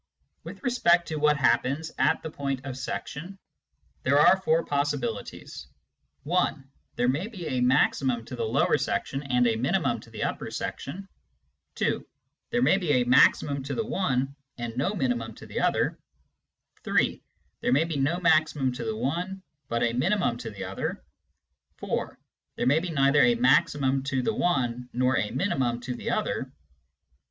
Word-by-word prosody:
With - - -10
respect 175 -9 +3
to 155 - -3
what 150 0 +3
happens 140 +3 +1
at - - +2
the 160 - -5
point 140 -3 -3
of 135 -2 -5
section, 165 +7 -6 0.6
there 140 +2 +3
are 190 +5 +6
four 165 -2 +2
possibilities: 140 -6 -3 0.6
(1) 150 -4 0 0.3
there 120 - +1
may 145 +10 0
be 195 -7 -8
a 130 -5 -1
maximum 125 -1 +2
to 125 - -7
the 120 - -3
lower 110 - +2
section 135 - -2
and 125 -3 +1
a 115 -2 +2
minimum 125 +4 0
to - - -15
the - - -5
upper - - -3
section, 190 +8 -5 0.7
(2) - - 0 0.5
there 245 - +1
may 195 - +4
be 165 -6 0
a 125 -2 +3
maximum 135 +3 +4
to 140 +2 -4
the 225 - -1
one 140 - -1 0.2
and 120 -1 -5
no 160 +11 0
minimum 120 - -1
to - - -12
the - - -4
other, - - +1 0.8
(3) - - +1 0.4
there - - 0
may 140 +5 +4
be 165 -1 -4
no 145 +6 +1
maximum 155 -6 +2
to 125 - -5
the 110 -1 -3
one, 180 - -3 0.3
but 115 0 0
a 115 -1 +1
minimum 175 - +1
to 115 - -5
the 100 -3 -7
other, 95 +1 -4 0.7
(4) - - -3 0.4
there - - -2
may 140 +5 +4
be 180 +2 -4
neither 140 -2 +4
a 240 - +5
maximum 145 - +3
to 135 -1 -1
the 225 - 0
one 125 - 0
nor 125 +1 +2
a 105 - -1
minimum 130 - 0
to 125 +1 -4
the 120 - -5
other. - - -2
140 Hz, 170 wpm, -27 LUFS, 125-165 Hz, 0.8 s, are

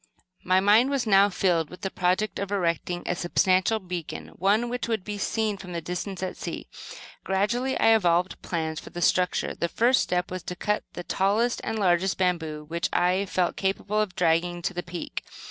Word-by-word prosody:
My 185 +1 +3
mind 210 +6 +5
was 275 -3 0
now 200 -1 +5
filled 175 -5 +1
with 180 - -12
the 195 - -3
project 185 +4 0
of 200 0 -4
erecting 175 -2 -1
a - - 0
substantial 185 +4 +2
beacon, 180 -5 -6
one 205 +6 +1
which 245 0 -3
would 220 -5 -1
be 205 +1 -5
seen 215 0 -1
from 180 -2 -8
some 165 - -3
distance 180 +2 -4
at 185 - -4
sea. - - -6 0.6
Gradually 235 +7 0
I 225 - +6
evolved 180 -3 +1
plans 160 -2 -3
for - - -11
the 175 - -7
structure. 180 -1 +2
The 170 - -2
first 245 +7 +3
step 180 0 -1
was 185 0 -4
to 180 - -6
cut 210 +3 -1
the 175 - -6
tallest 210 +7 +1
and 225 - -2
largest 185 -1 +2
bamboo 160 -5 -1
which 170 +2 -2
I 185 +3 +2
felt 180 -1 0
capable 200 +2 0
of 195 -4 -3
dragging 175 +1 +1
to 195 - -1
the 175 - -3
peak. 175 -1 -6
185 Hz, 195 wpm, -26 LUFS, 175-210 Hz, 0.6 s, I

